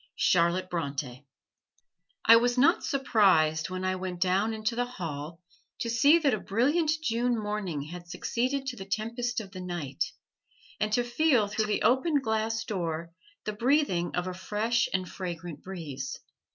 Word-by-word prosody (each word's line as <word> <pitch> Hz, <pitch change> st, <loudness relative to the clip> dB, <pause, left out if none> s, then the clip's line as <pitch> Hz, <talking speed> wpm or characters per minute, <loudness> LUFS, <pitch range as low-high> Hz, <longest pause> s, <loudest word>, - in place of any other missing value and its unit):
CHARLOTTE 180 Hz, +1 st, +3 dB
BRONTE 150 Hz, -4 st, -2 dB, 1.2 s
I 230 Hz, -, +9 dB
was 240 Hz, +2 st, +3 dB
not 265 Hz, -, +4 dB
surprised, 190 Hz, -, +3 dB
when 185 Hz, 0 st, -4 dB
I 185 Hz, 0 st, +1 dB
went 185 Hz, -1 st, -5 dB
down 190 Hz, +4 st, +2 dB
into 220 Hz, +1 st, -2 dB
the 245 Hz, +1 st, 0 dB
hall, 165 Hz, -, -6 dB, 0.4 s
to 230 Hz, -, -2 dB
see 280 Hz, +8 st, +6 dB
that 290 Hz, -6 st, +2 dB
a 215 Hz, -, 0 dB
brilliant 290 Hz, -, +1 dB
June 240 Hz, -2 st, +1 dB
morning 210 Hz, -8 st, -3 dB
had 175 Hz, +3 st, -9 dB
succeeded 255 Hz, +9 st, -1 dB
to 260 Hz, -2 st, -3 dB
the 190 Hz, -, -8 dB
tempest 235 Hz, +4 st, -2 dB
of 200 Hz, -4 st, -9 dB
the 185 Hz, -1 st, -7 dB
night, 170 Hz, -7 st, -3 dB, 0.8 s
and 215 Hz, 0 st, 0 dB
to 245 Hz, -, +3 dB
feel 240 Hz, -2 st, +2 dB
through 215 Hz, +1 st, -1 dB
the 210 Hz, -, 0 dB
open 285 Hz, +4 st, +3 dB
glass 225 Hz, -2 st, -1 dB
door 170 Hz, -6 st, -3 dB, 0.3 s
the 215 Hz, -, -2 dB
breathing 230 Hz, -, +1 dB
of 180 Hz, -, -1 dB
a 185 Hz, -, -3 dB
fresh 215 Hz, +5 st, 0 dB
and 185 Hz, -1 st, -1 dB
fragrant 175 Hz, -3 st, -6 dB
breeze. 150 Hz, -8 st, -6 dB
210 Hz, 160 wpm, -28 LUFS, 175-240 Hz, 1.2 s, I